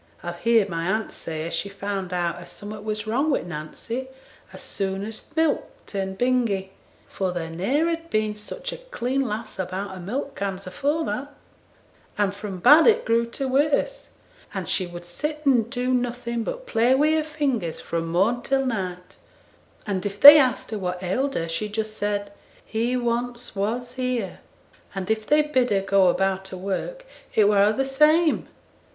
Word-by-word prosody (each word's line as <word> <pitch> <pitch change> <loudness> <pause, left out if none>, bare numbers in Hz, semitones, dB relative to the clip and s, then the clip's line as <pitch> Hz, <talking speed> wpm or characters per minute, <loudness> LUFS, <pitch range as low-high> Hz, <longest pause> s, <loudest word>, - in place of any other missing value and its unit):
I've 175 0 -5
heerd 230 -3 +4
my 165 -2 -3
aunt 220 +1 -1
say 160 -1 -5
as 170 - -5
she 165 +5 -2
found 195 -2 -4
out 175 -2 -1
as 175 - -11
summat 210 +1 -8
was 215 0 -3
wrong 260 +8 +1
wi' 280 - +1
Nancy 175 +10 -5 0.4
as - - -10
soon 195 0 -2
as 220 0 -5
th' 300 - -22
milk 320 -2 +2 0.2
turned 190 -1 -4
bingy, 235 -6 +1 0.4
for 190 -2 -2
there 165 -2 -4
ne'er 260 - +1
had 330 0 -3
been 215 0 +1
such - - -6
a - - -6
clean 275 - -2
lass 220 -4 -4
about 190 +2 -3
her 190 - -8
milk 255 +10 -4
cans 195 -1 -4
afore 290 - -1
that; 285 +1 -3 0.9
and 205 -2 +1
from 200 -2 -6
bad 295 - +7
it 465 +1 +4
grew 230 +1 +2
to 265 +3 -3
worse, 290 - 0 0.4
and - - -3
she 185 - 0
would 175 0 -9
sit 300 - -4
and 240 -5 +3
do 255 0 -1
nothing 240 -1 -1
but - - -5
play 245 - +3
wi' 300 +3 +3
her 315 0 +2
fingers 275 - -2
fro' 170 - -2
morn 190 +9 +1
till 270 +1 +1
night, 185 -7 -4 0.7
and 195 -3 -2
if 205 0 -4
they 290 +2 +12
asked 255 -5 +1
her 215 - -3
what 180 -1 -3
ailed 260 +10 0
her, 165 - -1
she 210 +6 -2
just 215 0 -3
said, 205 -1 -2 0.3
"He 235 +3 0
once 240 0 -2
was 235 +5 -2
here;" 250 -6 -2 0.6
and 195 +1 -2
if 220 -1 -1
they 300 0 +5
bid 260 -5 +1
her 195 -1 +2
go 195 -1 +4
about 190 +1 +1
her 190 - -7
work, 200 - -4 0.3
it 210 -2 +5
were 205 -1 +4
a' 210 - +4
the 270 +5 0
same. 305 +4 +3
220 Hz, 185 wpm, -24 LUFS, 190-265 Hz, 0.9 s, they